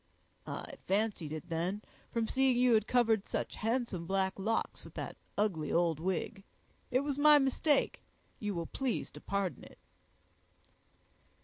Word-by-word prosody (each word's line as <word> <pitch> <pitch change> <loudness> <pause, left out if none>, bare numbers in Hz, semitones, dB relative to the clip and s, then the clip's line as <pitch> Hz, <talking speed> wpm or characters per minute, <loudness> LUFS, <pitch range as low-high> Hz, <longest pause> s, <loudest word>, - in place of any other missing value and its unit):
"I - - -6
fancied 195 -6 0
it 155 +2 -5
then, 175 +6 -1 0.3
from 230 -1 -1
seeing 265 -1 +3
you 250 -1 +5
had 220 0 +3
covered 225 -4 +3
such - - -3
handsome 225 -7 -1
black 190 0 0
locks 225 +4 -1
with - - -13
that - - -5 0.2
ugly 195 -7 0
old 165 -2 +2
wig. 190 +3 -2 0.5
It 255 +1 +2
was 285 -1 -2
my 300 0 +8
mistake; 280 +2 +2 0.4
you 205 -2 -2
will 170 -1 -2
please 260 +7 -2
to - - -11
pardon 195 -7 -2
it." - - -14
210 Hz, 145 wpm, -33 LUFS, 180-245 Hz, 0.5 s, my